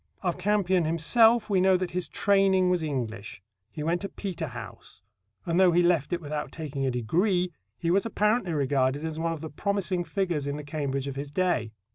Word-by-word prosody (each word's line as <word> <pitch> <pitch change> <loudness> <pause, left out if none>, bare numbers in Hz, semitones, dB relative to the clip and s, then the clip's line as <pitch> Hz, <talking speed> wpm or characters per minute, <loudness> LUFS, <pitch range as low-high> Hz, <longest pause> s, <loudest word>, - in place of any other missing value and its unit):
Of 180 -1 -1
Campion 190 -2 +2
himself 220 +8 +4
we 195 -3 +2
know 190 0 +5
that 180 -1 -3
his 180 0 -3
training 195 -2 +3
was 180 -2 +1
English. 115 -10 -4 0.3
He 150 - -6
went 170 +3 0
to 200 - -4
Peterhouse, 140 - -7 0.4
and, 170 +1 +1
though 185 -2 +6
he 175 +1 +4
left 175 -4 +2
it 175 - 0
without 150 -1 -4
taking 145 -4 -4
a - - +2
degree, 175 - 0 0.2
he 170 - -1
was 195 +2 +3
apparently 210 -4 +1
regarded 140 0 +1
as 160 0 -4
one 165 0 0
of 160 - -7
the 160 - -6
promising 190 +1 -1
figures 170 -4 -2
in 140 +1 -2
the 150 - -6
Cambridge 140 -2 -3
of 135 -1 -5
his 140 +1 -5
day. 145 -9 0
170 Hz, 195 wpm, -27 LUFS, 145-185 Hz, 0.4 s, though